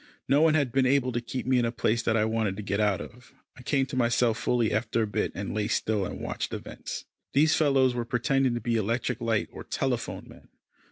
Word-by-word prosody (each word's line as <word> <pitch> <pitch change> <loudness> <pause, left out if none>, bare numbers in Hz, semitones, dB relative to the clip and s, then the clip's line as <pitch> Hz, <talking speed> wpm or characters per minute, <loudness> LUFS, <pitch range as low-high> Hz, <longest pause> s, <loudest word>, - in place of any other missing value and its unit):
No 140 +3 +4
one 160 -1 +5
had 140 -5 +1
been 130 +1 +3
able 130 -1 +2
to 120 0 -2
keep 125 +2 -5
me 130 0 +3
in 120 - +2
a 115 - 0
place 115 -1 0
that 115 -1 +1
I 110 - +3
wanted 110 -3 -1
to 105 - -5
get 100 0 -1
out 105 -3 +2
of. 125 +3 -12 0.2
I 135 - -13
came 135 +1 +1
to 130 - -7
myself 120 -2 +2
fully 120 -3 +1
after 110 +1 0
a - - +1
bit, 105 - -1
and - - -4
lay 105 0 -1
still 105 -4 0
and - - -7
watched - - -4
events. - - -7 0.3
These 150 +3 +4
fellows 135 -4 +3
were 120 -1 -2
pretending 125 +2 +1
to 120 - -3
be 120 -1 0
electric 115 +3 -1
light 115 -2 0
or - - -9
telephone - - -2
men. - - -15
120 Hz, 235 wpm, -27 LUFS, 110-130 Hz, 0.3 s, one